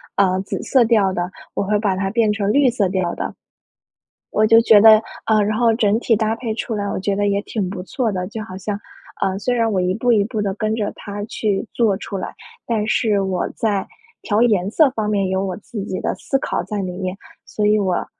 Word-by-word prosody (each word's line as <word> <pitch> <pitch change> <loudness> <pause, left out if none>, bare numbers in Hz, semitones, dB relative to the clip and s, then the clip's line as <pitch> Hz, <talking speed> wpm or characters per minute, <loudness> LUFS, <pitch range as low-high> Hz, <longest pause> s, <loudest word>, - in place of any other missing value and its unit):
呃， 185 -2 +2
紫 195 - -5
色 260 -3 +4
调 210 -5 +3
的， 175 0 -3 0.2
我 - - 0
会 210 +2 +1
把 200 -3 0
它 195 +1 -1
变 220 0 +2
成 205 -1 0
绿 280 +2 +4
色 215 -6 0
调 185 -2 -1
的。 - - -5 1.0
我 215 - +3
就 225 +1 +7
觉 225 -2 +6
得 220 0 +8 0.2
呃， 215 -1 +3
然 215 +1 0
后 230 -2 +3
整 215 -2 +2
体 235 -1 +2
搭 220 +1 0
配 230 -2 -3
出 225 0 -3
来， 205 - -2
我 200 - -2
觉 195 +1 -1
得 205 0 +1
也 200 0 0
挺 205 -4 -3
不 190 -2 -5
错 225 +3 -2
的。 180 -1 -3
就 220 0 -6
好 185 -4 -9
像， 200 +1 -4 0.4
呃， 190 0 0
虽 250 - 0
然 230 -2 +1
我 190 - +1
一 180 0 +1
步 240 +3 +1
一 210 - +4
步 220 -1 -3
地 200 -2 -1
跟 215 +1 -1
着 210 -2 -2
它 205 0 -6
去 210 -1 -2
做 220 -5 +2
出 200 - -6
来， 185 - -5 0.3
但 220 -3 -1
是 215 -2 +2
我 190 -1 -1
在 205 -4 -1 0.3
调 210 0 +1
颜 205 -5 +2
色 305 +6 +4
方 220 -5 -2
面 200 -2 +1
有 190 +1 0
我 185 -2 -3
自 215 0 -7
己 185 - -4
的 - - -1
思 270 - -1
考 - - -2
在 210 - -5
里 185 -2 -3
面， 185 +1 -4 0.3
所 210 - -2
以 210 +1 +4
我 185 -3 0
210 Hz, 255 characters per minute, -20 LUFS, 195-225 Hz, 1.0 s, 得